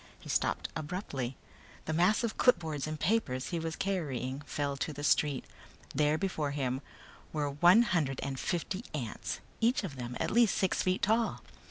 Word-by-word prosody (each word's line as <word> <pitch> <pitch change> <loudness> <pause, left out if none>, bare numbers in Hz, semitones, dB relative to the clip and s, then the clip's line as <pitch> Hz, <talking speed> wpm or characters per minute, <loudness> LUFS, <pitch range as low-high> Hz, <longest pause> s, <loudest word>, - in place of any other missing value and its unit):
He - - -11
stopped - - +1
abruptly. 145 - -4 0.5
The 160 - -1
mass 180 +8 +3
of 230 - -1
clipboards 160 - +2
and 155 0 -4
papers 150 - 0
he 170 - -1
was 160 -1 -3
carrying 145 -9 -2
fell 140 -1 -1
to 155 - -2
the 145 0 -7
street. 145 -2 +2 0.5
There 150 +2 +3
before 160 -5 -1
him 135 -2 -1 0.5
were 145 -2 -1
one 175 +10 +6
hundred 155 - 0
and 135 -1 -3
fifty 185 +4 -2
ants, 120 -7 -4 0.2
each 235 0 +3
of 150 -9 -5
them 125 0 -5
at - - 0
least 230 -1 +4
six 190 - +1
feet 185 0 0
tall. 225 +3 +2
155 Hz, 170 wpm, -32 LUFS, 140-190 Hz, 0.5 s, one